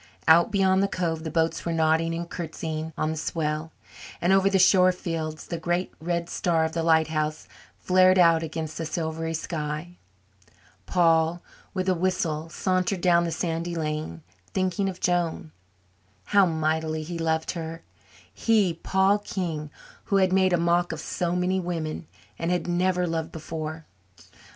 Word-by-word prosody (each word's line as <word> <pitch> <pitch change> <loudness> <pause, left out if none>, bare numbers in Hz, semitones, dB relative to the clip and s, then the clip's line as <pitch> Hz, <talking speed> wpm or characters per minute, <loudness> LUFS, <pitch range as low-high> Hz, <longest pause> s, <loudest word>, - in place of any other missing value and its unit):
Out 170 +4 +6
beyond 190 -2 +3
the 200 - +2
cove 165 -4 -2
the 160 - -3
boats 165 +1 0
were 170 - -2
nodding 165 0 +2
and 170 +1 -4
curtsying 160 -2 -5
on 155 - 0
the 160 - -4
swell, 155 0 -2 0.5
and 175 +2 +3
over 195 0 +4
the 195 - +2
shore 185 0 +6
fields 165 -3 -4
the 170 - -5
great 175 +2 -1
red 170 +1 -2
star 165 -2 +1
of 160 - -2
the 165 - -2
lighthouse 160 -1 +1 0.3
flared 185 0 +4
out 165 -2 +5
against 160 -1 -5
the 165 - -2
silvery 160 0 -3
sky. 155 +2 -4 0.9
Paul, 165 -1 +2 0.3
with 185 0 -1
a 185 - +4
whistle, 165 -3 -1
sauntered 185 +1 0
down 170 -1 +4
the 170 - -2
sandy 165 +1 -2
lane, 150 - -3 0.3
thinking 185 +1 0
of 185 -1 -7
Joan. 170 -3 -1 0.7
How 200 - +4
mightily 160 -1 -1
he 170 +2 -6
loved 160 -1 0
her 165 -1 -6 0.5
he, 200 - +2
Paul 190 +4 +2
King, 165 -7 -4 0.4
who 200 - 0
had 190 -1 +3
made 190 -1 +4
a 175 - +3
mock 170 +1 +1
of 165 - -5
so 175 +2 -2
many 180 +1 +1
women 165 -3 -4 0.3
and 165 - -1
had 180 0 0
never 180 +1 +1
loved 165 -1 -3
before! 160 0 -6
165 Hz, 160 wpm, -26 LUFS, 160-180 Hz, 0.9 s, Out